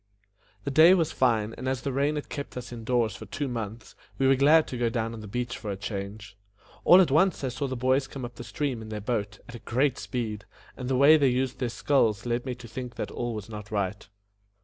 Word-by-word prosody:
The 140 - -3
day 160 +6 +7
was 165 -4 +1
fine, 115 -4 +1
and 130 +1 -2
as 130 -1 -2
the 135 - -2
rain 140 +3 +1
had 150 - -4
kept 140 -3 -6
us 125 -1 -7
in 115 -2 -7
doors 115 -3 +1
for 110 +2 -9
two 145 +7 -3
months, 115 -2 -6 0.2
we 135 - +1
were 135 - +5
glad 150 +4 +5
to 125 - -4
go 120 -1 +2
down 115 0 -2
on 115 - -7
the 105 - -8
beach 120 +4 -3
for 105 0 -6
a 100 - -3
change. 100 +1 -6 0.5
All 180 - +8
at 170 - +2
once 170 +2 +3
I 130 - 0
saw 135 +3 -3
the 130 - -3
boys 130 +2 +1
come 135 -2 -6
up 120 - -8
the 120 - -9
stream 135 -3 -3
in 110 - -9
their 105 -1 -4
boat, 105 -2 -2
at - - -10
a 120 - -8
great 130 +3 0
speed, 110 -5 -4 0.3
and 125 -1 -5
the 130 - +2
way 145 +4 +7
they 140 -3 +3
used 130 +1 -1
their 125 -3 -1
sculls 115 -5 +1
led 120 +2 -1
me 125 - -2
to 125 -1 -11
think 125 +1 -7
that - - -4
all 120 -1 -3
was 105 -2 -6
not 105 -2 -8
right. 100 -1 -2
120 Hz, 255 wpm, -27 LUFS, 110-135 Hz, 0.5 s, All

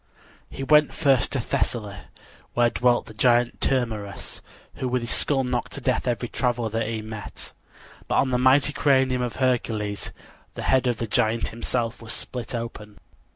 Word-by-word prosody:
He 135 - -6
went 150 +1 +4
first 135 -5 +3
to 135 - 0
Thessaly, 110 -3 -2 0.6
where 120 -1 +4
dwelt 120 -1 +2
the 110 - -11
giant 120 +1 +2
Termerus, 110 -6 -2 0.4
who 130 - -2
with 125 -1 0
his 120 - -2
skull 135 -2 +2
knocked 125 -2 -2
to - - -4
death 130 +1 0
every 120 -1 -1
traveler 120 -2 -1
that 115 0 -1
he 110 -1 -3
met; 110 -1 -8 0.5
but - - 0
on 130 - +2
the 125 - +2
mighty 135 +3 +4
cranium 130 -3 +3
of 125 -2 -2
Hercules 115 -5 -1 0.4
the - - -5
head 130 -1 +3
of 120 -2 +1
the 115 - -2
giant 110 +1 +1
himself 115 0 -3
was 115 0 -7
split 125 -1 -5
open. 105 -3 -6
120 Hz, 170 wpm, -25 LUFS, 115-130 Hz, 0.6 s, went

